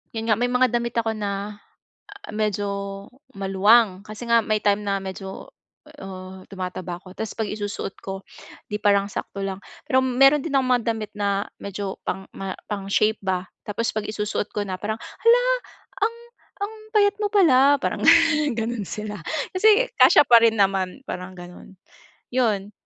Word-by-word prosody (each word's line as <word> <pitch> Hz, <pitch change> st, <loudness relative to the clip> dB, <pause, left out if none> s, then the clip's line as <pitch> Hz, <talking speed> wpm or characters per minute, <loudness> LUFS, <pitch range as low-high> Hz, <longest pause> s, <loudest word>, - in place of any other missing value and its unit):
yun 225 Hz, 0 st, -3 dB
nga -, -, +5 dB
may 245 Hz, -, +2 dB
mga 250 Hz, -1 st, +3 dB
damit 235 Hz, 0 st, -4 dB
ako 225 Hz, -1 st, +1 dB
na 205 Hz, 0 st, -4 dB, 0.7 s
a -, -, -8 dB
medyo 200 Hz, -2 st, -2 dB, 0.3 s
maluwang. 195 Hz, +1 st, +4 dB
Kasi 215 Hz, +2 st, -9 dB
nga 235 Hz, -, +6 dB
may 215 Hz, 0 st, 0 dB
time 205 Hz, 0 st, +2 dB
na 200 Hz, 0 st, +1 dB
medyo, 190 Hz, 0 st, -7 dB, 0.5 s
uh, 185 Hz, 0 st, -9 dB
tumataba 185 Hz, -2 st, -5 dB
ako 185 Hz, -1 st, -13 dB
ta's 220 Hz, -, -4 dB
'pag 220 Hz, -2 st, -2 dB
isusuot 205 Hz, -2 st, -5 dB
ko, 195 Hz, 0 st, -6 dB, 0.5 s
'di 210 Hz, -, -2 dB
parang 200 Hz, -1 st, +3 dB
sakto 200 Hz, -1 st, -5 dB
lang. 190 Hz, -1 st, -3 dB, 0.3 s
Pero 260 Hz, -, +3 dB
meron 270 Hz, +3 st, +5 dB
din 310 Hz, -, -4 dB
akong 260 Hz, -2 st, +2 dB
mga 230 Hz, -, -8 dB
damit 215 Hz, -1 st, -6 dB
na 200 Hz, -1 st, 0 dB, 0.2 s
medyo 200 Hz, -1 st, -5 dB
pang 190 Hz, 0 st, -3 dB
ma 195 Hz, -1 st, -4 dB, 0.2 s
pang 200 Hz, -2 st, -3 dB
shape 215 Hz, +2 st, +2 dB
ba, 185 Hz, -2 st, -1 dB, 0.2 s
tapos 215 Hz, +2 st, -1 dB
'pag 215 Hz, -1 st, -2 dB
isusuot 210 Hz, -1 st, -2 dB
ko 210 Hz, -, -1 dB
na, 185 Hz, -1 st, -3 dB
parang 215 Hz, +1 st, -3 dB
"hala, 470 Hz, +2 st, +3 dB, 0.6 s
ang 455 Hz, +2 st, 0 dB, 0.5 s
ang 405 Hz, -, -1 dB, 0.2 s
payat 410 Hz, -1 st, +4 dB
mo 415 Hz, -, +1 dB
pala", 285 Hz, -8 st, +5 dB
parang -, -, -1 dB, 0.6 s
ganun 225 Hz, -2 st, -3 dB
sila 210 Hz, -1 st, -5 dB, 0.4 s
kasi 435 Hz, +6 st, +4 dB
kasya -, -, +8 dB
pa 235 Hz, -, +9 dB
rin 225 Hz, -1 st, +4 dB
naman, 195 Hz, +4 st, +1 dB
parang 180 Hz, +1 st, -6 dB
gano'n. 175 Hz, +2 st, -12 dB, 0.6 s
'Yon, 210 Hz, -5 st, +1 dB
210 Hz, 165 wpm, -23 LUFS, 195-235 Hz, 0.7 s, pa